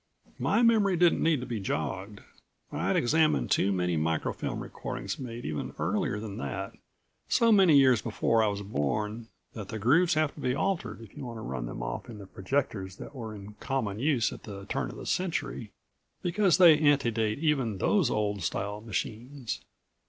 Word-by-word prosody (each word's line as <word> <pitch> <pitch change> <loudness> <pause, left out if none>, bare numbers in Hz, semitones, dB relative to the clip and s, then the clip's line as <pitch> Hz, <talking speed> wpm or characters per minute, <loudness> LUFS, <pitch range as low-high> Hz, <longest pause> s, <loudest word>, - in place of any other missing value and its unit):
My 235 - +2
memory 210 -5 +4
didn't 175 0 +4
need 155 -5 +2
to - - -4
be 115 -3 -3
jogged. 95 +3 -3 0.5
I'd 85 +6 0
examined 155 +5 +2
too 100 - +3
many 90 -3 0
micro 80 +1 0
film - - -4
recordings - - -5
made 120 -2 -6
even 75 -1 -4
earlier 105 - -1
than 105 -2 -6
that 70 -2 -4 0.6
so 230 -1 +4
many 190 -8 +6
years 130 -4 +5
before 115 0 +1
I 110 - +3
was 100 0 -2
born 105 +6 -2 0.3
that 105 -4 -7
the 110 - -4
grooves 155 - +3
have 155 -1 +1
to - - -13
be 125 -2 0
altered 155 - -2
if 110 - -13
you 145 - -7
want 120 -2 -6
to - - -7
run 65 - -4
them - - -6
off - - -5
in 115 - -8
the 100 - -9
projectors 95 -2 -2
that - - -10
were 110 -5 -6
in 100 +1 -10
common 110 -7 -2
use 130 -4 +1
at - - -10
the 100 -2 -8
turn - - -2
of - - -9
the - - -8
century, 155 - -2 0.5
because 180 +1 +3
they 170 -5 +8
ante 145 -5 +3
date 110 -1 0
even 135 -9 0
those 180 - +2
old 105 -3 -1
style 105 +5 -3
machines. 115 +4 -4
115 Hz, 190 wpm, -29 LUFS, 100-150 Hz, 0.6 s, they